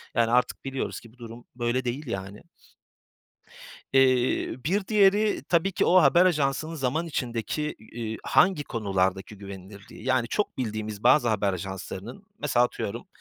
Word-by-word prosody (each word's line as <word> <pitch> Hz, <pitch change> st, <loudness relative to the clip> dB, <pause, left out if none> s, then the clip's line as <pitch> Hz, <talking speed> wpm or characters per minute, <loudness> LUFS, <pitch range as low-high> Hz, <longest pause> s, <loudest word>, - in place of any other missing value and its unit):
Yani, 115 Hz, -1 st, +2 dB
artık 125 Hz, +2 st, +1 dB
biliyoruz 135 Hz, 0 st, -3 dB
ki 115 Hz, -1 st, -17 dB
bu -, -, -24 dB
durum 120 Hz, 0 st, -10 dB
böyle 120 Hz, +1 st, -1 dB
değil, 130 Hz, +5 st, -3 dB
yani. 100 Hz, -1 st, -5 dB, 1.5 s
Eee, 130 Hz, -2 st, +3 dB
bir 190 Hz, +5 st, 0 dB
diğeri 210 Hz, 0 st, +3 dB
tabii 175 Hz, +3 st, +2 dB
ki -, -, +1 dB
o 185 Hz, 0 st, +6 dB
haber 170 Hz, +6 st, +5 dB
ajansının 155 Hz, -1 st, 0 dB
zaman 155 Hz, +3 st, -1 dB
içindeki, 135 Hz, +2 st, -3 dB
iii, 110 Hz, 0 st, -6 dB
hangi 180 Hz, -6 st, +3 dB
konulardaki 95 Hz, -3 st, -1 dB
güvenilirliği. 100 Hz, +1 st, -11 dB
Yani, 130 Hz, -2 st, +1 dB
çok 210 Hz, -, -2 dB
bildiğimiz 110 Hz, -3 st, -4 dB
bazı 125 Hz, 0 st, +5 dB
haber 105 Hz, -3 st, +1 dB
ajanslarının 95 Hz, +1 st, -7 dB
mesela, 120 Hz, -, +2 dB
atıyorum, 100 Hz, -4 st, -4 dB
125 Hz, 140 wpm, -26 LUFS, 110-150 Hz, 1.5 s, o